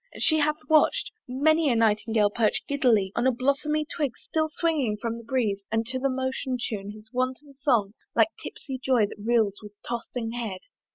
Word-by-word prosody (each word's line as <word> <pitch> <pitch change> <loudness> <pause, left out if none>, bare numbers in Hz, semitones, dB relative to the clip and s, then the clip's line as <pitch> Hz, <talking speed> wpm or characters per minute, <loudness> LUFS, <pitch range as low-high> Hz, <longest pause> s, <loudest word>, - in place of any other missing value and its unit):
And - - -3
she 315 -1 +4
hath 300 +1 0
watch'd 310 -1 +3 0.2
Many 305 +4 +3
a 240 - +3
Nightingale 220 -1 +2
perch 220 -1 +1
giddily 240 -9 +2
On 235 - +1
blosmy 285 +4 0
twig 290 -7 -2
still 315 -1 -1
swinging 300 -10 0
from 230 +1 -3
the - - -11
breeze, 225 -5 -1
And 225 +1 +1
to 260 +2 -2
that 275 +1 +1
motion 260 0 -2
tune 205 -4 -3
his 215 +1 -11
wanton 255 +3 -2
song, 245 -8 +1 0.2
Like - - +5
tipsy 265 -2 -7
Joy 250 -5 +4
that 205 0 -9
reels 220 -3 +2
with 210 -1 -11
tossing 235 -1 -4
head. 225 -6 -4
245 Hz, 180 wpm, -26 LUFS, 220-280 Hz, 0.2 s, Like